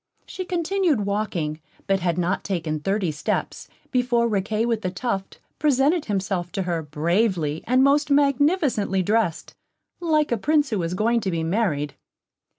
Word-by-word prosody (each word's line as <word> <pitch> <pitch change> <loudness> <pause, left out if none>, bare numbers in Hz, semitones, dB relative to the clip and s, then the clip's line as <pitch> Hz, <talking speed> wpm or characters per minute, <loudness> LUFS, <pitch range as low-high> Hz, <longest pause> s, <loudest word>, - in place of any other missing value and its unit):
She 370 - -6
continued 350 - +1
walking, 180 -7 -2 0.2
but 195 -1 +1
had 175 -2 0
not 180 +2 0
taken 160 -5 -2
thirty 195 +1 0
steps 150 - -3 0.2
before 245 -2 +2
Riquet 215 +1 0
with 230 -2 0
the 185 - -1
Tuft 195 0 -3 0.2
presented 295 +3 +2
himself 190 -3 -2
to 195 - -1
her, 170 -2 -1
bravely 160 +1 0
and 255 +2 +4
most 290 +2 +3
magnificently 280 - +2
dressed, 210 -4 0 0.5
like 310 -4 +1
a 235 - +2
Prince 295 +4 +1
who 210 - 0
was 170 +1 -2
going 230 +4 +2
to 200 - -2
be 165 -2 -1
married. 160 -6 0
210 Hz, 155 wpm, -23 LUFS, 175-270 Hz, 0.5 s, and